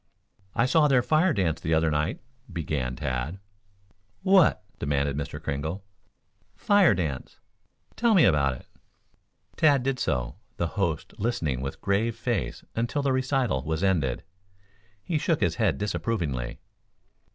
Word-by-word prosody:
"I 115 - +3
saw 150 +3 +4
their 130 -4 +3
fire 160 +6 +3
dance 90 - 0
the 80 +1 +1
other 80 0 +2
night," 75 +3 -1 0.3
began 75 -7 -2
Tad. 65 +9 -3 0.9
"What?" 185 - +4 0.2
demanded 70 0 0
Mr. 70 0 -4
Kringle. 80 +7 -4 0.7
"Fire 205 - +4
dance." 80 -8 -4 0.6
"Tell 235 -2 +3
me 175 - +6
about 70 -6 +3
it?" - - -13 0.9
Tad 145 -5 +4
did 135 -1 -1
so, 65 - -1 0.2
the 85 - -1
host 90 -7 -2
listening 90 - -1
with 70 0 -5
grave 110 +4 +1
face 115 -4 -2
until 120 +5 -1
the 135 -1 +2
recital 130 - 0
was 80 +5 -2
ended. 80 -11 +1 0.8
He 165 -4 -1
shook 160 0 +1
his - - +1
head 110 -4 +2
disapprovingly. 85 - -2
95 Hz, 135 wpm, -26 LUFS, -, 0.9 s, me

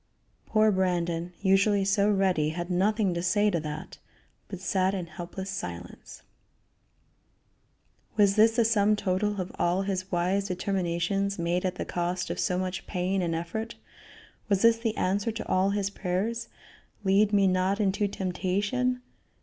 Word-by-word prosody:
Poor 215 -1 +4
Brandon, 175 -2 0
usually 195 +1 +3
so 200 +1 +3
ready, 190 -7 +2
had 175 +3 -4
nothing 200 +1 +2
"to 170 - -2
say 205 +4 +2
to 170 - 0
that," 155 0 -7 0.5
but 190 - -7
sat 190 +1 +1
in 180 -3 -3
helpless 175 +3 -7
silence. 90 - -7 1.9
Was 200 -2 +4
this 225 +1 +5
the 235 -2 +3
sum 215 -1 +3
total 205 +1 -1
of 185 0 -4
all 180 +3 +1
his 190 -1 -3
wise 185 +3 0
determinations 190 +1 -1
made 175 +2 -1
at 185 -1 -1
the - - -4
cost 175 +1 -2
of - - -4
so 180 - 0
much 185 0 -3
pain 185 +1 -1
and 170 -2 -1
effort? 220 +8 -4 0.7
Was 200 0 +2
this 230 0 +5
the 225 -2 -2
answer 200 +4 0
to 225 - -6
all 185 +1 +2
his 200 -1 -1
prayers, 210 +5 -2 0.6
"Lead 200 +2 +3
me 200 -2 +4
not 185 +2 +1
into 205 0 +1
temptation"? 200 +7 -1
190 Hz, 150 wpm, -27 LUFS, 180-205 Hz, 1.9 s, this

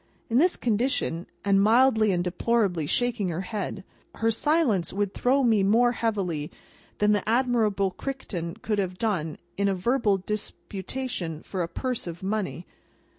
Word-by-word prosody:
In 235 - +4
this 355 +4 +4
condition, 225 -7 0 0.2
and 195 -1 +4
mildly 220 0 +4
and 175 -1 +1
deplorably 180 -3 0
shaking 240 -1 0
her 170 +1 -2
head, 195 -1 -4 0.3
her 225 0 +1
silence 245 - +2
would 200 0 -1
throw 265 +2 +2
me 225 -4 +4
more 230 +5 +4
heavily 195 -11 -2 0.5
than 210 0 +3
the 205 0 0
Admirable 225 -5 +2
Crichton 185 -9 -5
could 210 -2 0
have 185 -2 -2
done 180 -9 -1 0.2
in 200 0 +2
a 195 - +1
verbal 210 +1 +2
disputation 195 -2 -5
for 190 - -4
a 170 - -1
purse 250 +3 -3
of 170 +2 -7
money. 195 -3 -2
205 Hz, 150 wpm, -26 LUFS, 185-235 Hz, 0.5 s, In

